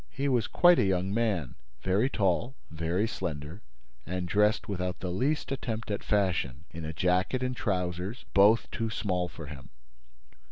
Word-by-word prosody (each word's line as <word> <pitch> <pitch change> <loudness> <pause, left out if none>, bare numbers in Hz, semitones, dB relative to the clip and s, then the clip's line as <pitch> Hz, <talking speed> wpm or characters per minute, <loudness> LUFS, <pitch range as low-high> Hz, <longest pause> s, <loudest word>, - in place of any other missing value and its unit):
He 140 - -2
was 125 -5 +2
quite 175 -1 +5
a - - +4
young 95 0 +1
man, 100 - 0 0.3
very 100 +8 +2
tall, 110 +4 0 0.2
very 85 +6 0
slender 80 -2 -5 0.4
and 90 +3 -3
dressed 105 +6 +2
without 90 -3 -3
the 90 - -3
least 140 +13 0
attempt 115 -5 -3
at 100 - -2
fashion, 85 - 0
in 85 0 -7
a 80 - -3
jacket 90 - +1
and 125 0 -1
trousers 90 +1 -2
both 105 +4 +5
too 115 -1 -2
small 90 -5 -1
for 80 -2 -9
him. 70 -3 -10
95 Hz, 160 wpm, -29 LUFS, 90-115 Hz, 0.4 s, quite